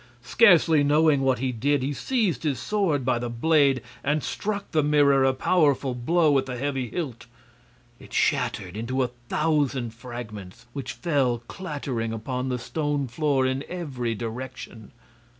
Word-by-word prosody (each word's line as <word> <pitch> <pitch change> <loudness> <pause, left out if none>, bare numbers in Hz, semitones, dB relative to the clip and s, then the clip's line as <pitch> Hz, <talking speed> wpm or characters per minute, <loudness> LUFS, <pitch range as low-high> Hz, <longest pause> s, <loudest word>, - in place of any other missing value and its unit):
Scarcely 170 -8 +5
knowing 150 0 +4
what 130 -2 +2
he 130 +1 -1
did, 140 +3 0
he 140 +2 -1
seized 205 - 0
his 145 -5 -1
sword 175 -11 0
by 125 -2 +1
the 120 0 -3
blade 135 0 +2 0.2
and 150 +1 0
struck 205 -1 -3
the 155 - +3
mirror 145 -2 +4
a 135 - +4
powerful 140 -2 +2
blow 155 +6 +2
with 135 -2 +2
the 125 -1 -4
heavy 135 -2 -2
hilt. 130 -8 -5 0.7
It - - -15
shattered 90 -1 0
into 130 +4 -1
a 125 - -1 0.2
thousand 145 -6 0
fragments, 115 -6 -9
which 140 -2 -5
fell 130 -8 0
clattering 140 - -4
upon 125 +3 -3
the 125 - -1
stone 145 +1 -2
floor 135 +1 +1
in 130 +2 -1
every 130 -10 -3
direction. 120 -1 -7
135 Hz, 150 wpm, -25 LUFS, 125-150 Hz, 0.7 s, Scarcely